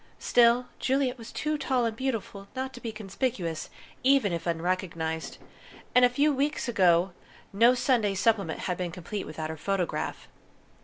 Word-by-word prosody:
Still, 240 +1 +4
Juliet 265 -1 0
was 230 - -9
too 305 -1 -2
tall 255 -4 +1
and 225 -1 -1
beautiful 225 -6 -3
not 260 +1 -3
to 245 - -10
be 230 - -4
conspicuous 195 - -3 0.3
even 265 -8 +4
if 170 0 -3
unrecognized, 165 -1 -2 0.6
and 250 - +6
a 250 - +7
few 285 +4 +2
weeks 285 +2 -1
ago 185 -5 +3 0.4
no 235 +5 +5
Sunday 240 -6 +2
Supplement 195 -4 +1
had 180 -2 -2
been 180 -1 -1
complete 185 +4 -5
without 155 0 -5
her 160 - -7
photograph. 190 +2 -2
215 Hz, 155 wpm, -28 LUFS, 180-250 Hz, 0.6 s, a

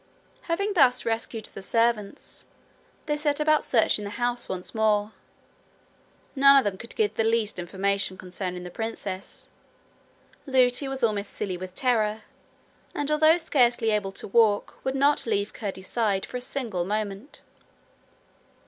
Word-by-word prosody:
Having 400 +5 0
thus 260 -8 +4
rescued 225 -1 -3
the - - -8
servants, 230 -1 -1 0.6
they 295 - 0
set 295 -1 0
about 305 0 +3
searching 220 -3 +2
the 200 - -5
house 240 +2 0
once 180 -1 -5
more. 215 -1 +1 1.2
None 275 0 +7
of 270 - +5
them 205 -3 -1
could 225 +5 -10
give 435 -2 +1
the 225 - 0
least 225 -3 0
information 190 +2 -1
concerning 180 -1 -6
the 180 - -8
princess. 205 -3 -6 1.0
Lootie 255 0 +3
was 270 -1 -5
almost 210 -3 0
silly 190 -3 -4
with 185 +1 -8
terror, 220 -4 0 0.7
and, 290 0 -2
although 310 +2 +5
scarcely 240 -8 +2
able 205 -2 0
to - - -8
walk 210 -1 +2
would 265 0 -1
not 280 -1 +2
leave 205 -2 -1
Curdie's 190 -3 -6
side 205 -5 0
for - - -6
a - - -6
single 240 -8 -3
moment. 210 +5 -4
225 Hz, 145 wpm, -26 LUFS, 200-265 Hz, 1.2 s, None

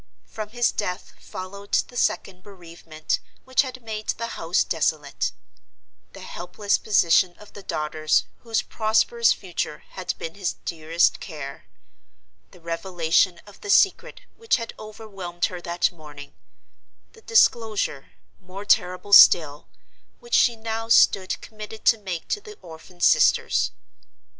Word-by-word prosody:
From 215 -1 -7
his 240 +2 +1
death 180 -2 -4
followed 200 +2 -9 0.2
the 245 - -15
second 185 -6 -1
bereavement 170 -5 -6 0.3
which 260 0 +3
had 255 -3 -7
made 215 -1 -6
the 230 0 -2
house 165 -3 0
desolate; 155 -3 -1 0.8
the - - -11
helpless 200 +4 -2
position 175 -3 +3
of 210 - -16
the 205 - -10
daughters 155 -3 0
whose 225 -2 -1
prosperous 220 +1 +2
future 175 -5 -4
had 185 -1 -4
been 165 - -6
his 190 -4 -3
dearest 165 +1 +1
care; 150 -6 -8 0.8
the 180 - -18
revelation 170 +1 0
of 205 -1 -16
the 205 - -8
secret 400 - +2 0.2
which 455 0 +1
had 230 -2 -5
overwhelmed 200 -5 -5
her 180 -1 -6
that 175 +2 0
morning; 150 -4 -12 0.8
the 450 - -18
disclosure, 220 - +1 0.3
more 185 +2 -10
terrible 185 +1 +1
still, 150 -6 +7 0.5
which 475 0 -13
she 240 - +4
now 225 0 -5
stood 190 -4 +4
committed 215 0 -10
to 225 - +5
make 185 -5 -6
to 415 - -1
the 425 0 -12
orphan 165 +2 -13
sisters. - - +3
190 Hz, 135 wpm, -24 LUFS, 170-220 Hz, 0.8 s, still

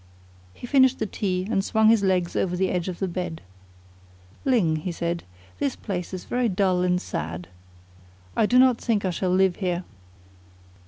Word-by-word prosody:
He 245 - -10
finished 260 0 +4
the 220 - -1
tea, 185 -2 -2
and 195 -4 +1
swung 220 +1 +3
his 225 -2 +5
legs 185 -3 +1
over 180 -1 0
the 190 +1 +1
edge 180 -1 -1
of 180 - -5
the 190 - -1
bed. 175 -2 -4 1.1
"Ling," 195 -12 +2
he 165 +4 -4
said, 170 0 -3 0.4
"this 280 -3 0
place 180 -4 -5
is 185 -2 -6
very 245 -1 0
dull 185 -2 +1
and 180 0 +2
sad. 85 - -5 0.9
I 215 - +3
do 245 - +3
not 255 -2 +5
think 215 -5 0
I 185 - +1
shall 180 +2 -1
live 185 0 +3
here." 180 -2 -1
185 Hz, 175 wpm, -25 LUFS, 180-220 Hz, 1.1 s, his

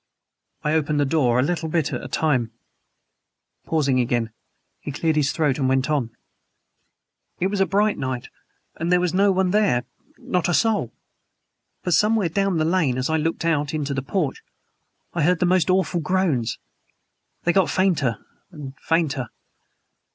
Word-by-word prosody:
I 150 - 0
opened 150 -1 +1
the 145 - +3
door, 135 -5 +2
a - - +3
little 160 +1 -2
bit 155 -2 0
at - - -3
a - - -5
time." 130 -8 0 1.2
Pausing 140 -5 +1
again, 120 -2 0 0.5
he - - -6
cleared 160 +3 0
his 145 -2 +2
throat, 150 -4 0
and 130 -1 +1
went 135 +3 +1
on: 135 -6 0 1.3
"It 185 +2 0
was 200 -2 0
a 195 - +3
bright 205 +1 +1
night, 130 -2 -3 0.5
and 170 +2 -2
there 180 - +5
was 180 -1 0
no 200 +2 +4
one 190 -1 +1
there 200 - +2 0.3
not 180 -1 -1
a 175 - +2
soul. 225 -2 +1 0.9
But 180 - 0
somewhere 210 -1 +3
down 195 +1 0
the 155 - +1
lane, 160 -7 +1
as 130 +4 -1
I 160 - +2
looked 165 +1 -2
out 150 -2 0
into 145 -2 -2
the 135 - -2
porch, 150 0 -2 0.7
I 170 - -1
heard 175 +3 +2
most 180 0 +2
awful 185 -2 +1
groans! 155 -9 0 0.9
They 175 - +2
got 190 +1 +3
fainter 170 -11 0 0.2
and 145 -7 -9
fainter. 150 -7 0
160 Hz, 165 wpm, -23 LUFS, 135-180 Hz, 1.3 s, there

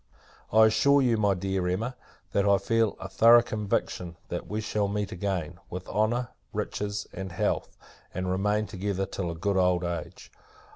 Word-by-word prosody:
I 110 +1 +7
assure 140 +6 +4
you, 120 -2 +3
my 100 -2 +2
dear 95 0 -1
Emma, 110 +8 -1 0.4
that 100 - +2
I 100 -1 +5
feel 115 +2 +1
a 95 - -6
thorough 115 +4 +6
conviction, 100 -6 -2
that 85 - -4
we 105 - -3
shall 105 -1 -1
meet 100 0 -2
again, 90 -4 -3
with 90 +1 -6
honour, 120 +3 0 0.2
riches, 105 0 -3
and 95 0 -6
health, 85 - -1 0.3
and 95 +1 -3
remain 105 +3 +1
together 95 -1 -2
till 95 -2 -4
a 85 - -4
good 100 +4 0
old 90 -1 +3
age. 85 -1 -5
100 Hz, 165 wpm, -28 LUFS, 90-110 Hz, 0.4 s, I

